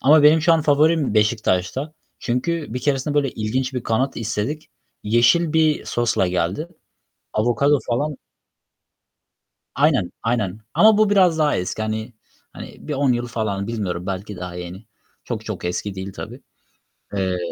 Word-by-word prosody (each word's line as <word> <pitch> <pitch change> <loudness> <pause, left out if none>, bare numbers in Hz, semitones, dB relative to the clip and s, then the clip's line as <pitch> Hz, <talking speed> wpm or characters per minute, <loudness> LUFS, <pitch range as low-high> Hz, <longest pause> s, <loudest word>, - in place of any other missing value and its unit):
ama 150 +3 +6
benim 155 +2 +6
şu 170 -1 +5
an 160 -2 +3
favorim 150 -3 +3
Beşiktaş'ta. 110 - +1 0.3
Çünkü 130 +1 -2
bir - - -1
keresinde 145 +1 0
böyle 140 -3 +2
ilginç 130 +5 -2
bir 125 - -2
kanat 130 +4 0
istedik. 115 +7 -3 0.3
Yeşil 120 +10 +3
bir 155 -2 +2
sosla 120 -5 +1
geldi. 90 - -1 0.7
Avokado 130 +6 +2
falan 145 +5 -1 1.6
Aynen, 140 - +2
aynen! 110 -4 -1
Ama 215 -1 +6
bu 215 -1 +4
biraz 185 -5 +4
daha 150 -1 +3
eski. 90 +4 -3
Hani 110 +2 -3 0.4
hani - - -9
bir 150 - -2
10 135 -2 +2
yıl 120 0 -2
falan. 105 -4 -2
Bilmiyorum, 95 -6 -3
belki 100 +2 -4
daha 90 -1 -6
yeni. 90 +4 -8 0.4
Çok - - -5
çok - - -5
eski 95 +3 -3
değil 95 +1 -6
tabii. - - -8 0.7
Eee 95 -2 0
120 Hz, 145 wpm, -21 LUFS, 105-150 Hz, 1.6 s, ama